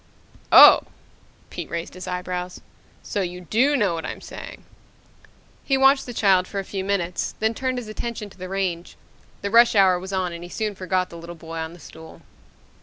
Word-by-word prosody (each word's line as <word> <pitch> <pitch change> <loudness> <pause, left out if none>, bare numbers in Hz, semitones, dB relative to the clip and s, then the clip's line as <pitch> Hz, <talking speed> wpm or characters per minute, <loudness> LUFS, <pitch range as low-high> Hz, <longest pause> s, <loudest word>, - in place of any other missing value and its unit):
"Oh?" - - +9 0.7
Pete - - -6
raised 170 0 -5
his 185 0 -9
eyebrows. 180 0 -4 0.4
"So 205 - -3
you 180 -1 -5
do 250 - +2
know 205 -7 +1
what 165 -1 -4
I'm - - -6
saying." - - -10 1.0
He 270 - +1
watched 270 0 +4
the - - -5
child 190 -4 +3
for 200 - -7
a 195 - -1
few 190 0 -5
minutes, 185 -3 -2
then 220 +1 +1
turned 255 +2 -2
his 245 -3 -5
attention 215 0 -5
to - - -18
the 185 0 -7
range. 185 -3 -3 0.5
The 200 - -2
rush 235 0 +6
hour 190 -3 +5
was 190 +2 -8
on 185 -2 -1
and 170 0 -8
he 175 - -9
soon 215 +2 -3
forgot 185 -1 -2
the 170 - -9
little 170 +1 -9
boy 165 0 -8
on 160 +1 -5
the 175 - -14
stool 160 +1 -13
185 Hz, 195 wpm, -23 LUFS, 175-215 Hz, 1.0 s, Oh